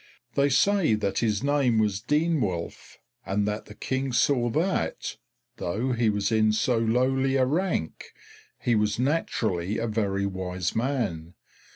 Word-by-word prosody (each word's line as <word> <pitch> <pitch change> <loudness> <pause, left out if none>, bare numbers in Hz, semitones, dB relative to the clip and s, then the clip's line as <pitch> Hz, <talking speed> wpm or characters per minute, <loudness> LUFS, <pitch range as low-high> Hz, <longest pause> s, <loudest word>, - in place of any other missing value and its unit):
They 140 0 +2
say 185 - +3
that 100 -2 -1
his 110 -1 0
name 140 -5 +2
was 105 -2 +1
Denewulf, 135 - -1 0.3
and 100 +1 -1
that 105 +1 -3
the 105 - -12
King 130 +3 -2
saw 120 0 +2
that, 170 +10 -1 0.4
though 110 +9 -2
he 120 -2 +2
was 105 +1 0
in 110 -1 +3
so 115 +2 +1
lowly 130 +4 +1
a 130 -1 +3
rank, 155 - -1 0.5
he 120 - +1
was 105 -1 +1
naturally 110 - -1
a 115 - -1
very 100 -3 -1
wise 90 -2 -3
man. 110 - -2
115 Hz, 145 wpm, -26 LUFS, 100-135 Hz, 0.5 s, say